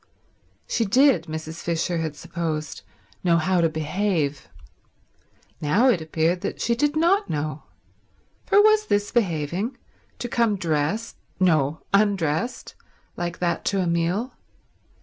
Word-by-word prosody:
She 230 - 0
did, 245 - +4
Mrs. 160 +1 -6
Fisher 170 +1 -1
had 160 -2 -3
supposed, 160 -2 -4 0.4
know 170 -2 +4
how 180 +2 +2
to 165 - +3
behave. 155 -2 -1 1.1
Now 195 - +3
it 185 -9 +2
appeared 160 +3 0
that - - -4
she 235 - +1
did 295 +5 +1
not 365 +6 +2
know, 150 0 -3 0.8
for 405 - +5
was 430 0 +5
this 205 0 0
behaving, 190 - -1 0.4
to 245 - -4
come 235 -3 +1
dressed—no, 160 -2 -1
undressed—like 190 -2 -2
that 175 -1 -1
to 200 - +1
a 185 - +1
meal? 170 +8 0
175 Hz, 120 wpm, -24 LUFS, 160-225 Hz, 1.1 s, for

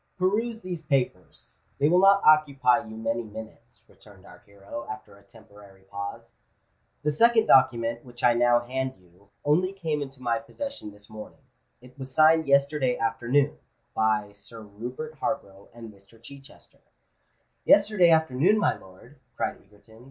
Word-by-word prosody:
"Peruse 220 +5 -1
these 180 -4 -6
papers—they 140 0 -3
will 175 +3 +4
not 195 +1 +5
occupy 140 -4 +4
you 110 0 -10
many 115 +1 -2
minutes," 110 0 -12
returned - - -19
our - - -15
hero, 100 +4 -10
after 125 -5 -9
a 100 - -20
temporary 100 -2 -18
pause. 100 +1 -8 0.7
"The 150 - +1
second 230 +7 +3
document, 115 -3 +3
which 120 -2 -14
I 120 - +5
now 120 0 +3
hand 130 +2 -4
you, 90 +3 -26 0.2
only 175 +6 +2
came 160 -6 -3
into 135 -1 -8
my 120 -2 -1
possession 275 - -8
this 105 0 -16
morning: 110 -1 -12 0.4
it 125 +2 -18
was 130 0 -8
signed 155 +2 +4
yesterday 140 -2 +2
afternoon, 120 +5 0 0.3
by 110 -2 0
Sir 100 +3 -13
Rupert 125 +9 -8
Harborough 100 -9 -5
and 115 -2 -12
Mr. 100 +3 -21
Chichester——" 135 +4 -16 0.8
"Yesterday 200 -4 +4
afternoon, 160 +4 +3
my 210 - +1
lord!" 95 +9 -17 0.2
cried - - -4
Egerton. 105 +2 -21
125 Hz, 145 wpm, -26 LUFS, 110-155 Hz, 0.8 s, not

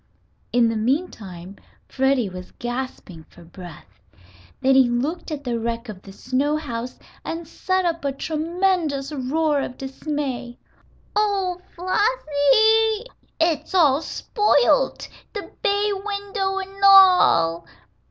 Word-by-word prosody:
In 240 -1 +3
the 225 - -1
meantime 215 - -3 0.3
Freddie 265 -4 +1
was 180 -1 -9
gasping 240 -9 -6
for 175 - -16
breath. 175 -1 -13 0.6
Then 270 0 +3
he 265 -2 +5
looked 275 +11 -2
at 295 -2 -5
the 240 -3 -2
wreck 230 +1 -4
of 195 -3 -8
the 195 - -12
snow 265 +8 -1
house 250 -5 -6 0.3
and 330 0 -5
set 375 +3 -1
up 335 -2 -1
a 280 - 0
tremendous 320 -1 -1
roar 295 +2 0
of 255 - -6
dismay. 265 -3 -5 0.6
"Oh, 390 -4 0
Flossie, 435 - +2 0.3
it's 330 +2 0
all 300 -5 +4
spoilt! - - +1 0.3
The 410 - -7
bay 410 +1 +1
window 400 -1 -3
an' 390 +1 -7
all!" 360 - +6
290 Hz, 120 wpm, -22 LUFS, 240-380 Hz, 0.6 s, all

